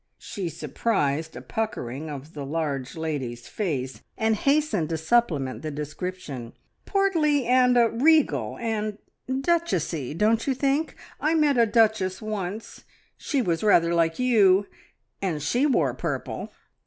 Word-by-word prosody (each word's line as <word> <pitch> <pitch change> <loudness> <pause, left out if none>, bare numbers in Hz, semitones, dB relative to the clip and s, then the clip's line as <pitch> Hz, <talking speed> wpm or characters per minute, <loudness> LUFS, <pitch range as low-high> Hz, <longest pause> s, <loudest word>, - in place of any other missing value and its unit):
She 190 -4 -5
surprised 160 -2 -1
a - - -8
puckering 155 - -4
of 145 +2 -8
the 145 - -6
large 140 -3 -3
lady's 135 -7 -4
face, 135 -11 -3 0.2
and 220 0 +2
hastened 275 - +1
to 165 - -1
supplement 160 - +1
the 155 - -4
description. 150 -4 -6 0.3
"Portly, 325 -9 +2
and 250 0 +4
er 235 -1 +6
regal, 300 +7 +2
and 215 -2 -2 0.3
duchessy, 260 - 0
don't 220 +6 +2
you 270 - +1
think? 280 +4 0 0.2
I 310 +2 +1
met 295 -5 +3
a 230 - +5
duchess 210 -4 +2
once 215 -1 -5 0.3
she 275 -4 -1
was 170 -5 0
rather 170 -5 +4
like 165 -1 +2
you 205 -6 +4 0.6
and 180 -6 -1
she 240 - +1
wore 275 - +2
purple!" - - -4
200 Hz, 135 wpm, -25 LUFS, 155-250 Hz, 0.6 s, er